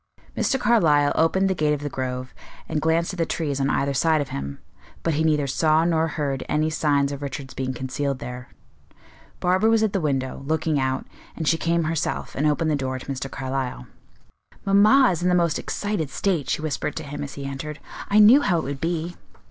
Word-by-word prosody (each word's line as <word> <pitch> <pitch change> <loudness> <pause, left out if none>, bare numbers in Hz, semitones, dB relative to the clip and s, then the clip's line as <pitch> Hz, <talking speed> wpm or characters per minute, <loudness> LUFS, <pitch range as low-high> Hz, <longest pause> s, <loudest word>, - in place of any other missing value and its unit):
Mr. 270 - +1
Carlyle 160 -12 +4
opened 190 +4 +2
the 190 - +1
gate 150 -4 +1
of 145 - -8
the 145 - -3
Grove, 130 -2 -4 0.3
and 150 - -2
glanced 165 +3 +1
at 185 - -8
the 165 - +2
trees 145 -4 -2
on 135 - +1
either 140 -1 0
side 155 +3 +2
of 145 - -3
him, 70 0 -5 0.5
but 165 - +1
he 155 +2 +1
neither 150 -2 +2
saw 155 +4 +2
nor 165 -1 +2
heard 145 -4 -2
any 155 +1 +1
signs 145 -3 +1
of 140 0 -6
Richard's 140 -1 -6
being 130 -1 -3
concealed 130 +2 -3
there. 125 0 -8 0.9
Barbara 185 +5 +2
was 225 -1 +3
at 215 - 0
the 195 - 0
window, 135 -3 -1
looking 155 -1 0
out, 130 0 -1 0.3
and 160 - -4
she 165 - +4
came 170 +1 0
herself 160 -1 -2
and 150 +3 +1
opened 155 +1 +1
the - - +2
door 130 -2 -2
to 130 - -10
Mr. 135 -1 -4
Carlyle. 130 - -4 0.8
"Mamma 210 +7 +5
is 175 -2 -3
in 180 - +2
the 180 - +3
most 170 -3 +2
excited 205 -8 -3
state," 170 -4 -1
she 150 - -1
whispered 150 -1 -2
to 160 - -4
him 145 0 -6
as 140 - -7
he 140 - -6
entered. 140 +2 -5 0.3
"I 205 - +3
knew 220 +7 +8
how 180 -10 +2
it 160 - -1
would 135 0 -5
be." 170 +1 -2
150 Hz, 210 wpm, -24 LUFS, 135-170 Hz, 0.9 s, knew